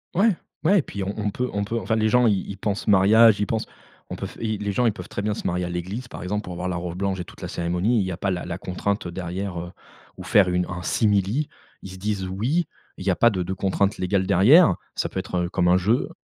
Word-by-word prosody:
Ouais, 200 +1 +4 0.3
ouais. 190 +5 +5
Et - - +3
puis 100 -7 -6
on 100 +1 -3
on 105 -1 -1
peut 125 +4 -2
on 100 0 0
peut 115 +3 -2
enfin, 110 0 -1
les 110 0 +2
gens, 125 +1 +4
ils 100 -3 0
ils 100 - -6
pensent 100 +2 -3
mariage, 105 +2 +6
ils 105 - +1
pensent 110 -1 -2 0.4
on - - -4
peut - - -5
f - - -10
et 110 -2 -2
les 105 0 -2
gens 125 +4 +1
ils 110 - +3
peuvent 90 -2 -9
très 100 - -4
bien 105 0 0
se - - -7
marier 90 0 0
à - - -4
l'église, 95 +8 -4
par 120 - -8
exemple, 105 +3 -2
pour 90 - -7
avoir 90 +1 -3
la 90 - -2
robe 90 0 -5
blanche 95 -1 -1
et 90 - -4
toute - - -15
la - - -4
cérémonie. 90 +7 0
Il 95 - +1
y 95 - -3
a 85 - -5
pas 100 - -1
la 90 -1 -3
la 85 0 -4
contrainte, 95 +2 -2
heu, 85 - -6
derrière, 90 +1 -4
heu 85 +1 -7 0.5
ou - - -8
faire 95 -3 +4
une 90 0 +1
un 90 0 -5
simili, 105 - +1 0.3
ils 95 - -8
se 95 - -9
disent 100 -1 -2
«oui», 120 - 0 0.3
il 95 - -8
y 95 - +3
a - - +1
pas 120 - +5
de 95 -5 -2
de 95 - -3
contraintes 100 +1 0
légales 95 +1 0
derrière, 135 - +6 0.2
ça - - -1
peut - - -4
être, 95 -1 -5
heu, - - -5
comme 90 -2 +1
un 90 +1 +5
jeu. 110 +8 +1
100 Hz, 290 wpm, -24 LUFS, 90-110 Hz, 0.5 s, mariage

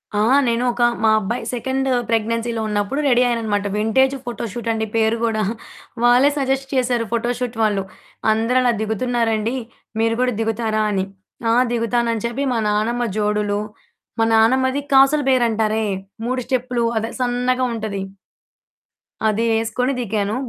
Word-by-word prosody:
ఆ! - - +1 0.3
నేను 235 +1 +1
ఒక 240 +1 -5 0.2
మా 220 - +5
అబ్బాయి 225 +4 -3
సెకండ్ 265 +2 -1 0.2
ప్రెగ్నెన్సీలో 230 +1 0
ఉన్నప్పుడు 210 +7 -1
రెడీ 250 -2 +4
అయ్యాననమాట. 220 -4 -1
వింటేజు 265 +5 +2
ఫోటో 240 -1 -5
షూటండి 225 -2 -2
పేరు 225 +1 +2
గూడా. 225 -2 +1 0.6
వాళ్ళే 245 +4 +5
సజెస్ట్ 270 0 0
చేశారు 245 -2 +1
ఫోటో 235 +1 0
షూట్ 245 -2 -4
వాళ్ళు. 205 -3 +1 0.5
అందరలా 245 +3 +2
దిగుతున్నారండి, 225 +1 0 0.5
మీరు 225 0 +2
గూడా 250 -1 +1
దిగుతారా 220 -1 0
అని. 190 -1 0 0.5
ఆ! 230 - +3 0.2
దిగుతానని 230 -1 0
చెప్పి 270 +4 -3
మా 230 - 0
నానమ్మ 230 +4 0
జోడులు, 210 -1 0 0.6
మా 225 - +4
నానమ్మది 260 +5 +3
కాసుల 275 +3 +5
బేరంటారే, 220 -3 +2 0.4
3 255 0 -1
స్టెప్పులు 250 -2 0
అదే 225 +2 -4
సన్నగా 250 +1 +1
ఉంటది. 215 -3 -4 1.2
అది 220 +1 +2
యేసుకొని 230 +4 0
దిగాను. 210 -2 -1
230 Hz, 130 wpm, -20 LUFS, 220-250 Hz, 1.2 s, మా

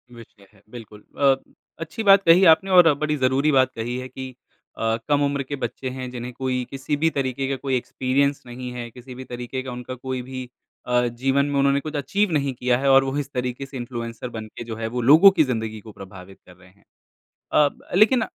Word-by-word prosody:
विषय 105 -3 -16
है। 100 - -23
बिल्कुल, 110 -3 -11
अ, 140 -1 +4 0.4
अच्छी 165 +7 -5
बात 195 -1 +6
कही 175 +3 +6
आपने 190 +4 -4
और 175 -4 +7
बड़ी 150 0 0
ज़रूरी 135 +3 +2
बात 130 -1 +3
कही 120 +2 -4
है 130 0 -6
कि 130 -1 -8 0.4
अ, 115 0 0
कम 145 0 +3
उम्र 140 -1 -1
के 145 +2 -5
बच्चे 130 0 -5
हैं 130 -1 -6
जिन्हें 125 0 -6
कोई 130 -1 -2
किसी 135 +2 -3
भी 160 +2 +2
तरीके 135 -2 -2
का 135 - 0
कोई 135 -2 -1
एक्सपीरियंस 135 +3 -1
नहीं 125 +1 -7
है। 120 -1 -6
किसी 125 +1 -12
भी 130 - -8
तरीके 125 +1 -5
का 130 - -6
उनका 125 +1 -7
कोई 130 0 -5
भी 130 0 -7 0.4
अ, 125 0 +1
जीवन 135 +4 0
में 145 -1 -2
उन्होंने 140 0 +3
कुछ 155 +1 -7
अचीव 180 +8 0
नहीं 140 -3 0
किया 125 0 0
है 135 0 +1
और 135 0 +6
वो 135 +2 -3
इस 140 0 -5
तरीके 125 +1 -3
से 135 -1 -9
इन्फ्लुएंसर 120 -1 -6
बनके 110 +2 -8
जो 115 - -6
है 110 0 -4
वो 120 +2 -3
लोगों 160 +10 +8
की 165 -5 +3
ज़िंदगी 110 -4 -3
को 110 - -12
प्रभावित 95 -1 -12
कर 90 - -16
रहे 95 0 -20
हैं। 100 +2 -28 0.7
अ, 145 -1 +5
ब - - -20
लेकिन 220 +3 +4
130 Hz, 220 wpm, -23 LUFS, 120-140 Hz, 0.7 s, लोगों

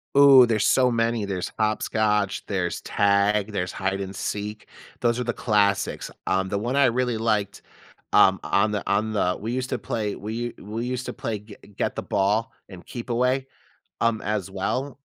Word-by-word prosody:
Ooh, 140 -3 +9
there's 110 -3 +1
so 125 -1 +4
many. 115 -2 0
There's 95 -2 -3
hopscotch, 105 -1 0
there's 90 -4 -2
tag, 100 +1 +2
there's 90 -3 -2
hide 95 0 -2
and 95 0 -5
seek; 105 +2 -4 0.3
those 120 0 +1
are - - 0
the 120 0 -2
classics. 100 -4 +1 0.2
Um, 95 0 +1
the 100 - -1
one 120 +5 -2
I 140 -1 +5
really 125 -1 +1
liked, 105 -3 -1 0.5
um, 95 0 +6
on 100 +7 +2
the 105 -1 -3
on 105 +2 +1
the 90 -3 +1
we 110 +3 -4
used 130 0 -2
to 125 - -1
play 105 -2 -3
we 105 +3 -6
u 120 +1 -3
we 110 +4 -5
used 125 0 -3
to - - -4
play 110 -2 -4
g 105 0 -13 0.2
get - - -1
the - - -4
ball 105 +3 +1 0.2
and 90 -2 -11
keep 120 0 -8
away, 125 +3 +1 0.5
um, 115 -2 +1
as 100 -2 -2
well. 125 +8 -3
105 Hz, 185 wpm, -24 LUFS, 100-120 Hz, 0.5 s, Ooh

